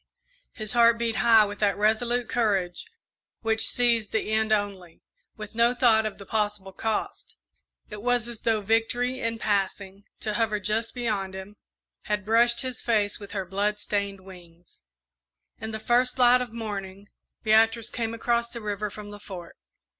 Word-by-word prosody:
His 215 Hz, -1 st, -4 dB
heart 235 Hz, -1 st, +5 dB
beat 230 Hz, -1 st, -1 dB
high 225 Hz, -2 st, +6 dB
with 205 Hz, 0 st, -7 dB
that 205 Hz, -2 st, +2 dB
resolute 235 Hz, +3 st, +1 dB
courage 195 Hz, -7 st, 0 dB, 0.6 s
which 225 Hz, -1 st, +1 dB
sees 235 Hz, -3 st, +2 dB
the 220 Hz, 0 st, -2 dB
end 220 Hz, 0 st, +1 dB
only, 200 Hz, -5 st, -2 dB, 0.3 s
with 215 Hz, -1 st, -8 dB
no 235 Hz, +2 st, +3 dB
thought 220 Hz, -3 st, +4 dB
of 215 Hz, -, -7 dB
the 200 Hz, -, -11 dB
possible 205 Hz, -2 st, -2 dB
cost 220 Hz, +2 st, -4 dB, 0.5 s
it 210 Hz, -1 st, -7 dB
was 245 Hz, 0 st, +1 dB
as 235 Hz, -2 st, -7 dB
though 225 Hz, -2 st, +1 dB
Victory, 235 Hz, +4 st, 0 dB
in 230 Hz, -2 st, -2 dB
passing, 200 Hz, -1 st, -2 dB, 0.2 s
to 215 Hz, -, -2 dB
hover 215 Hz, -1 st, 0 dB
just 215 Hz, +5 st, -1 dB
beyond 205 Hz, -6 st, -2 dB
him, 190 Hz, +2 st, -9 dB, 0.5 s
had 210 Hz, -1 st, -2 dB
brushed 235 Hz, +2 st, +3 dB
his 255 Hz, -2 st, -4 dB
face 210 Hz, -3 st, +1 dB
with 200 Hz, -1 st, -10 dB
her 195 Hz, -2 st, -2 dB
blood 200 Hz, +3 st, -1 dB
stained 200 Hz, -1 st, -3 dB
wings. 175 Hz, -2 st, -16 dB, 0.8 s
In 220 Hz, -, -4 dB
the 220 Hz, -, -4 dB
first 245 Hz, +3 st, +1 dB
light 250 Hz, 0 st, +6 dB
of 245 Hz, -3 st, -4 dB
morning, 200 Hz, -3 st, -6 dB, 0.4 s
Beatrice 225 Hz, +1 st, +3 dB
came 230 Hz, -1 st, -3 dB
across 235 Hz, 0 st, 0 dB
the 235 Hz, -, -7 dB
river 210 Hz, -1 st, -3 dB
from 205 Hz, 0 st, -9 dB
the 205 Hz, -, -10 dB
Fort. 180 Hz, -3 st, -9 dB
215 Hz, 165 wpm, -26 LUFS, 205-235 Hz, 0.8 s, high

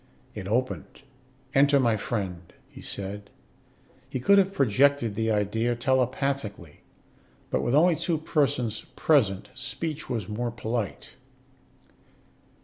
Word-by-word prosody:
It 95 Hz, -3 st, -6 dB
opened. 130 Hz, +5 st, -2 dB, 0.5 s
"Enter, 140 Hz, +1 st, +5 dB
my 120 Hz, -4 st, +3 dB
friend," 95 Hz, -6 st, -4 dB, 0.2 s
he -, -, -13 dB
said. 100 Hz, +1 st, -6 dB, 0.8 s
He 130 Hz, -, -3 dB
could 200 Hz, +11 st, +5 dB
have 195 Hz, 0 st, +2 dB
projected 135 Hz, -, +3 dB
the 110 Hz, +2 st, -1 dB
idea 110 Hz, +3 st, +1 dB
telepathically; 130 Hz, -, -1 dB, 0.7 s
but -, -, +1 dB
with 120 Hz, -, +1 dB
only 165 Hz, +2 st, +5 dB
two 170 Hz, -3 st, 0 dB
persons 125 Hz, -8 st, 0 dB
present, 110 Hz, -11 st, +2 dB
speech 155 Hz, +3 st, -4 dB
was 110 Hz, -6 st, -2 dB
more 120 Hz, +3 st, -2 dB
polite. 115 Hz, -2 st, -4 dB
120 Hz, 115 wpm, -27 LUFS, 105-140 Hz, 0.8 s, Enter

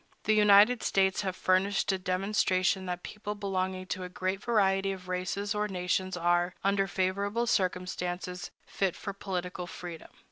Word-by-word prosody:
The 215 Hz, -, +3 dB
United 210 Hz, +3 st, +6 dB
States 190 Hz, +1 st, +2 dB
have 190 Hz, -2 st, -2 dB
furnished 190 Hz, +2 st, +2 dB
a 190 Hz, -, -1 dB
demonstration 185 Hz, 0 st, +1 dB
that 180 Hz, 0 st, -4 dB
people 210 Hz, 0 st, -6 dB
belonging 190 Hz, -2 st, -2 dB
to 185 Hz, -, -7 dB
a 180 Hz, -, -6 dB
great 185 Hz, +2 st, -2 dB
variety 195 Hz, -4 st, +2 dB
of 185 Hz, -1 st, -8 dB
races 185 Hz, +3 st, -2 dB
or 210 Hz, 0 st, 0 dB
nations 185 Hz, -1 st, -1 dB
are, 175 Hz, +1 st, +1 dB
under 195 Hz, 0 st, +2 dB
favorable 200 Hz, +4 st, 0 dB
circumstances, 180 Hz, -2 st, -2 dB, 0.2 s
fit 195 Hz, -3 st, -1 dB
for 200 Hz, -, -5 dB
political 180 Hz, -2 st, -4 dB
freedom. 175 Hz, -2 st, -8 dB
190 Hz, 150 wpm, -30 LUFS, 180-200 Hz, 0.2 s, United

